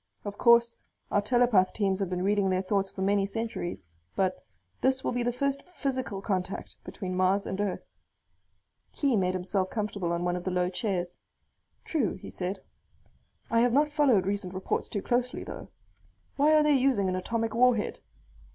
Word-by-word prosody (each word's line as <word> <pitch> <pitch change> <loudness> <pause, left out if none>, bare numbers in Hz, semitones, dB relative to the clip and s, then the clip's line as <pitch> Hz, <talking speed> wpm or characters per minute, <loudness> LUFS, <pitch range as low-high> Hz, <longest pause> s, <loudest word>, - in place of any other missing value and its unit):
Of 205 0 -4
course 235 0 +5 0.4
our 205 - +3
telepath 230 -4 +3
teams 195 -3 0
have 195 -3 -1
been 180 0 -2
reading 200 0 +2
their 185 0 +1
thoughts 195 0 0
for 190 - -5
many 200 0 +2
centuries, 200 - -4 0.3
but 185 -1 0 0.4
this 265 0 +2
will - - 0
be 245 0 -1
the 240 0 +1
first 275 +3 -1
physical 260 - -3
contact 190 -2 -3
between 185 -3 -5
Mars 185 +2 +2
and 190 +1 -3
Earth." 205 -2 -2 1.1
Khee 275 -4 +1
made 185 -2 +1
himself 185 +1 -1
comfortable 205 -5 -2
on 170 +1 -1
one 175 0 0
of 180 - -4
the 185 - -1
low 180 -1 +1
chairs. 180 -2 -2 0.7
"True," 280 - 0
he 185 - -10
said. 185 +2 -4 0.9
"I 230 - +4
have 240 0 +3
not 295 +3 +4
followed 275 -11 +3
recent 195 -2 -2
reports 190 - -2
too 200 - -4
closely, 245 +1 0
though. - - -8 0.7
Why 300 +2 +4
are 305 - +5
they 300 -1 +4
using 255 -7 +2
an 185 - 0
atomic 225 +4 -2
warhead? 240 -2 +2
205 Hz, 175 wpm, -28 LUFS, 185-245 Hz, 1.1 s, course